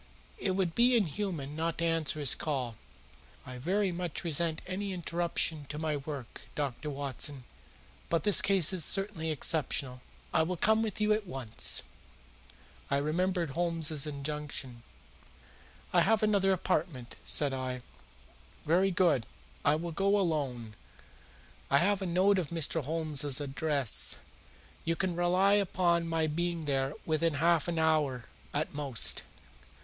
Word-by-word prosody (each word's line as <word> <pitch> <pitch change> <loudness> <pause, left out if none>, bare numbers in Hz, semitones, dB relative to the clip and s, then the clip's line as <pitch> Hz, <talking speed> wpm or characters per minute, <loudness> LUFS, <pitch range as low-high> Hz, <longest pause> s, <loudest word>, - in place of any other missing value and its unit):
It 190 -2 0
would 185 -4 0
be 245 +4 +4
inhuman 175 - -1
not 165 +1 -2
to 170 - 0
answer 165 -2 0
his 145 -3 +3
call. 130 -7 -2 0.7
I 125 -1 -8
very 190 +7 +1
much 175 -2 -3
resent 165 -1 0
any 195 +1 -3
interruption 170 -3 -2
to 150 - -4
my 155 -1 -1
work, 140 -4 -7
Dr. 145 +1 -3
Watson, 140 -1 -3 0.7
but 165 -2 +1
this 205 - +5
case 190 -3 +4
is 180 -4 +4
certainly 195 -4 +1
exceptional. 140 -4 0 0.3
I 160 - +4
will 175 +3 -1
come 220 +5 +3
with 220 -2 -2
you 210 0 +3
at 210 -2 -2
once." 130 -9 -1 1.1
I 140 - +2
remembered 170 +2 0
Holmes's 165 -2 0
injunction. 140 -4 -5 1.1
"I - - +5
have 220 +1 +3
another 200 -2 +3
appointment," 155 -8 -1
said 145 -3 +1
I. 130 -1 -4 0.8
"Very 180 +5 +3
good. 170 -9 +2 0.4
I 145 - +4
will 170 +2 -4
go 195 +4 +2
alone. 140 - -1 1.0
I 140 - +5
have 200 +5 +2
a 190 - -2
note 190 +3 +3
of 170 - -2
Mr. 165 -1 0
Holmes's 150 -3 0
address. 140 -3 +1 0.7
You 165 +1 0
can 180 +1 -1
rely 180 +3 +3
upon 175 -4 +2
my 165 -1 +1
being 170 +1 -2
there 135 -1 0
within 160 0 +1
half 165 +2 +3
an 170 -1 -2
hour 150 -6 +1 0.3
at 150 +2 -2
most." 140 -5 0
160 Hz, 140 wpm, -31 LUFS, 145-180 Hz, 1.1 s, this